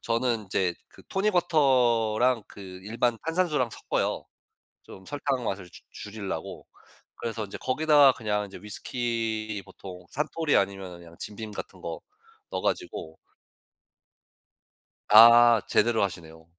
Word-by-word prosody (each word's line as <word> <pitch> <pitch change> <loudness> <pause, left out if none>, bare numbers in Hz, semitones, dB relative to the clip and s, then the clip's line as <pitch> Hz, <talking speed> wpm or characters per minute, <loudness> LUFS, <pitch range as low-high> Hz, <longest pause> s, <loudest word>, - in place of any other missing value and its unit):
저는 115 -1 -1
인제 95 -2 -1
그 - - -18
토닉 195 +1 0
워터랑 125 -7 +3
그 - - -13 0.2
일반 115 +3 -1
탄산수랑 165 -7 +1
섞어요, - - -2 0.6
좀 95 - -13
설탕 140 -3 -2
맛을 95 -4 -4
줄 - - -15
줄이려고. 105 -2 -7 0.5
그래서 115 -2 -4
인제 100 - -8
거기다가 145 0 +4
그냥 105 -3 -2
이제 100 - -11
위스키 110 -1 -3
보통 90 -2 -11
산토리 150 +1 0
아니면은 95 -2 -2
그냥 85 -1 -15
짐 105 - -6
빔 110 -2 -7
같은 - - -8
거 - - -6 0.5
넣어 - - -3
가지고 80 - -3 1.9
아 115 +1 +8
제대로 115 0 +2
하시네요. 80 -4 -5
115 Hz, 270 characters per minute, -27 LUFS, 100-130 Hz, 1.9 s, 아